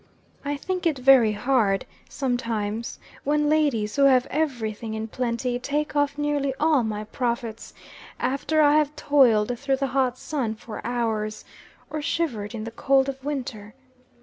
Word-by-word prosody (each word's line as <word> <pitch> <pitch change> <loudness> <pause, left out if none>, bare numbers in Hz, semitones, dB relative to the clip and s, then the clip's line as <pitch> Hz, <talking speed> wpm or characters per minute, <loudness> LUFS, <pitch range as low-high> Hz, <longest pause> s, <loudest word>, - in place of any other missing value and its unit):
I 285 0 -2
think 365 +4 -2
it 310 -4 0
very 255 -4 +6
hard, 210 -3 +1 0.2
sometimes, 230 -4 -2 0.3
when 295 +1 +1
ladies, 280 -9 +1
who 280 -1 +4
have 260 -2 +5
every 260 -8 -1
thing 220 +1 -6
in 220 0 -4
plenty, 245 +1 -2
take 295 +4 -2
off 290 0 +1
nearly 290 -2 0
all 305 -3 +4
my 215 -1 -3
profits, 235 0 -4 0.4
after 305 +4 +1
I 295 +1 +5
have 300 -1 +1
toiled 245 -6 +3
through 275 -1 0
the 275 - 0
hot 255 -2 +1
sun 255 -8 -3
for 215 0 -8
hours, 220 -3 -2 0.5
or 305 0 -3
shivered 245 -10 -2
in 215 - -5
the 225 - -6
cold 270 +3 +2
of 270 -1 -7
winter. 250 -7 -5
255 Hz, 155 wpm, -25 LUFS, 225-290 Hz, 0.5 s, very